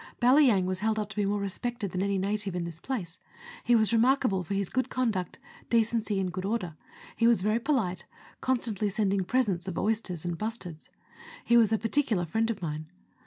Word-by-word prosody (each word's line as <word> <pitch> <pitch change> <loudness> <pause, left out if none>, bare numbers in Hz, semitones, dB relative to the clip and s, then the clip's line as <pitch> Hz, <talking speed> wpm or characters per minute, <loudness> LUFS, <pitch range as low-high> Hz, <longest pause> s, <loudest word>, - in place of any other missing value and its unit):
Balyang 250 -6 +5
was 185 0 -1
held 220 +1 0
up 210 -1 -2
to - - -9
be 205 -1 +1
more 205 +1 0
respected 205 +1 -3
than 185 - -2
any 200 0 0
native 200 0 -2
in 175 - -2
this 170 -1 -6
place; 185 -8 -5 0.4
he 240 - +4
was 220 0 +3
remarkable 230 -5 +3
for 195 +4 -3
his 195 -2 -2
good 255 0 0
conduct, 220 -9 -1 0.3
decency, 225 -3 +1
and 185 -2 -2
good 185 0 -4
order; 195 -6 -2 0.4
he 230 - +3
was 230 -6 +4
very 215 +3 +2
polite, 220 - -1 0.3
con 260 0 +2
stantly 215 -3 -2
sending 200 -1 +1
presents 195 -4 0
of 180 -4 -4
oysters 205 -6 -1
and 175 -1 -3
bustards. 210 -8 -6 0.6
He 235 - +4
was 225 -3 +5
a 220 - +3
par 225 +1 -3
ticular 220 -12 +1
friend 225 +7 0
of 210 -5 -4
mine. 155 -1 -4
210 Hz, 205 wpm, -28 LUFS, 185-230 Hz, 0.6 s, Balyang